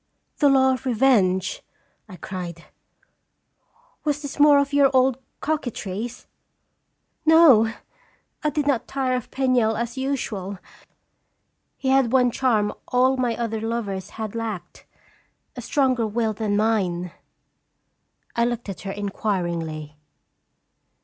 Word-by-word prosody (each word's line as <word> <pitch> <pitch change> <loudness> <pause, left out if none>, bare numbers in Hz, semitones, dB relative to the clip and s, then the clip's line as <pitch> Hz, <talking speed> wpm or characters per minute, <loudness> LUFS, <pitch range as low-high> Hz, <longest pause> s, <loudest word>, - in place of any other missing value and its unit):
"The 290 - +5
law 265 -1 +4
of 260 +1 -5
re 250 - +1
venge!" 190 -7 +2 0.5
I 185 - -9
cried. 175 -1 -7 1.4
"Was 295 0 -1
this 285 0 -7
more 290 -1 +7
of 280 0 +1
your 280 -1 +5
old 260 0 +3 0.2
coquetries?" 240 -6 -4 0.5
" - - -50 0.2
No; 285 -9 +7 0.7
I 300 - +2
did 295 0 -1
not 280 -5 0
tire 265 -2 -1
of 250 - -4
Penniel 250 -5 +1
as 235 +3 -3
usual. 215 -8 -3 1.2
He 265 - -2
had 265 -3 +3
one 250 -2 +4
charm 225 -5 +1
all 255 +1 +3
my 245 -3 -1
other 225 -2 -2
lovers 210 -4 -3
had 220 -2 -4
lacked: 215 -6 -6 0.7
a - - -6
stronger 255 -6 +1
will 220 0 -1
than 210 -1 -1
mine." 185 -5 0 1.2
I 235 - +2
looked 240 -2 -3
at 195 - -6
her 195 - -5
inquiringly. 170 -7 -3
235 Hz, 125 wpm, -23 LUFS, 205-265 Hz, 1.4 s, more